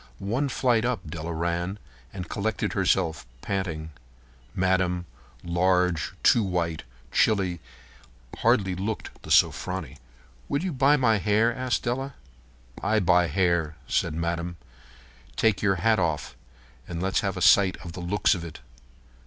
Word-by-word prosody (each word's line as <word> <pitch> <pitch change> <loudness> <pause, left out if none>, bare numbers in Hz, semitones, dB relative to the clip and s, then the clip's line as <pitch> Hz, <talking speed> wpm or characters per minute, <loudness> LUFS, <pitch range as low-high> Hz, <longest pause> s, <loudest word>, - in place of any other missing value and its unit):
One 120 +9 -1
flight 120 -3 +2
up 120 -8 -2
Della 80 +1 -5
ran, 85 +3 -2 0.3
and 90 -3 -6
collected 105 +3 -2
herself, 85 -5 +1 0.2
panting. 80 -5 -3 0.6
Madame, 95 -1 +1 0.4
large, 90 -1 +1
too 115 - +5
white, 85 -5 -1 0.3
chilly, 95 -5 +2 0.8
hardly 95 -2 +2
looked 100 +4 -4
the - - -11
"Sofronie." 85 -7 +1 0.5
"Will 140 +4 0
you 185 -3 -2
buy 140 +2 +4
my 115 -6 +3
hair?" 110 +4 +2
asked 130 -1 -1
Della. 135 +3 -2 0.7
"I 110 +2 +2
buy 90 -2 +4
hair," 85 -2 +1
said 80 - 0
Madame. 85 +1 -3 0.8
"Take 110 -3 +2
yer 95 -2 +2
hat 110 +4 +2
off 75 -7 -1 0.5
and 85 -1 -5
let's 95 +2 +1
have 100 -1 -2
a - - -2
sight 100 -1 +5
at 85 - -7
the 90 - -7
looks 95 +3 +2
of 90 - -4
it." 85 -2 -9
95 Hz, 135 wpm, -26 LUFS, 85-110 Hz, 0.8 s, too